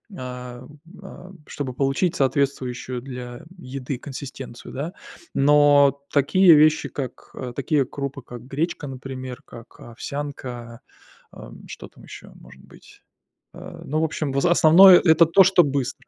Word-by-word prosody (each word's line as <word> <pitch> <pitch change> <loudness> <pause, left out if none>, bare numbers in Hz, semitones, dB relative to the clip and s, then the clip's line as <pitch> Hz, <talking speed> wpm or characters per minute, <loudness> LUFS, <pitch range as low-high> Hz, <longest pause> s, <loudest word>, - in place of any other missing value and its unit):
ам, 125 +1 -9 0.2
а, 190 -1 -12 0.2
чтобы 130 -3 -6
получить 135 +6 -1
соответствующую 130 -2 -2
для 125 +1 -9
еды 135 -3 -6
консистенцию, 130 -2 -10
да. 155 +8 -5 0.4
Но 145 0 +4
такие 165 +5 +5
вещи, 155 +1 +3
как, 130 -4 -8
э, 125 -2 -7
такие 140 0 0
крупы, 140 -1 -6
как 120 0 -11
гречка, 155 +4 -4
например, 130 -1 -8
как 115 +1 -15
овсянка, 120 -2 -8 0.5
ам, - - -13
что - - -10
там - - -20
ещё - - -13
может 65 +1 -17
быть? - - -19 0.5
А, - - -11
ну, 155 +3 -2
в - - +2
общем, 150 -2 -4
в 140 - 0
за 175 - +2
основное 175 +3 +7
это 160 -1 +4
то, 190 +4 +5
что 185 -1 +4
быстро. 140 -4 -4
140 Hz, 140 wpm, -22 LUFS, 125-155 Hz, 0.5 s, основное